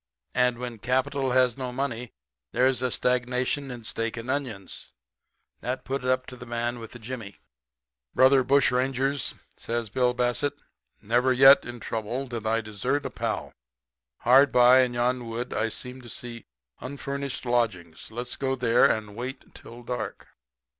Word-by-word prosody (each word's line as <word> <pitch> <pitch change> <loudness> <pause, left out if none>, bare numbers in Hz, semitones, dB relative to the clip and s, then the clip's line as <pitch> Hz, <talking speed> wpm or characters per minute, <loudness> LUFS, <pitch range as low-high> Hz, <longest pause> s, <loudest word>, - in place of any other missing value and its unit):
And 125 -1 +2
when 120 -2 -6
capital 130 +2 0
has 130 -1 +3
no 130 -1 -3
money 125 -2 -3 0.4
there's 130 -1 +2
a 130 - +1
stagnation 125 +3 0
in 120 -2 -7
steak 115 +1 -3
and 115 +3 -3
onions. 115 - -4 0.7
That 125 +1 -4
put 135 0 -3
it 125 - -1
up 130 0 +1
to 125 - -9
the 125 -1 -11
man 120 +1 -2
with 115 -1 -9
the - - -8
jimmy. 115 -3 -7 0.8
"'Brother 130 0 +6
bushrangers,' 135 +1 +1 0.2
says 115 -2 -3
Bill 125 0 +2
Bassett, 125 +3 0 0.5
'never 120 +4 +2
yet, 135 +2 +8
in 120 0 -7
trouble, 115 +5 -3
did 115 -4 -5
I 115 +1 +2
desert 110 +7 -2
a - - -3
pal. - - -3 0.7
Hard 135 +3 +6
by, 125 +1 +7
in 125 -1 0
yon 120 0 0
wood, 115 +2 -4
I 115 - 0
seem 125 +3 -6
to 120 - -11
see 115 -1 -7 0.3
unfurnished 140 0 -5
lodgings. 110 -9 -1
Let 115 +2 -4
us 125 - -5
go 135 -1 0
there 120 -2 +4
and 105 -2 -2
wait 125 +3 -7
till 120 +1 -12
dark.' 120 -2 -5
125 Hz, 160 wpm, -26 LUFS, 115-130 Hz, 0.8 s, yet